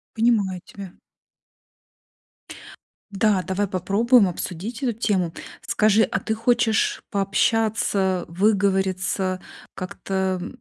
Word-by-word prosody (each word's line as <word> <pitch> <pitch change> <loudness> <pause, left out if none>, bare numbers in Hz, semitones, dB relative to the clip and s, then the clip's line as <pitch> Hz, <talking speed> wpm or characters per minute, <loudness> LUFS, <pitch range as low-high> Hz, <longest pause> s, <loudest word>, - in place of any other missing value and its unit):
Понимаю 210 -6 +1
тебя. 195 -3 -11 2.2
Да, 200 -2 +2
давай 195 +1 -1
попробуем 200 +5 +3
обсудить 185 +7 -5
эту 240 -3 +1
тему. 190 -7 -1 0.3
Скажи, 215 +1 +3
а - - -1
ты 220 - -2
хочешь 230 0 +1
пообщаться, 200 -2 +1
выговориться 190 0 0 0.4
как-то, 190 0 -3
м - - -5
195 Hz, 90 wpm, -23 LUFS, 185-220 Hz, 2.2 s, попробуем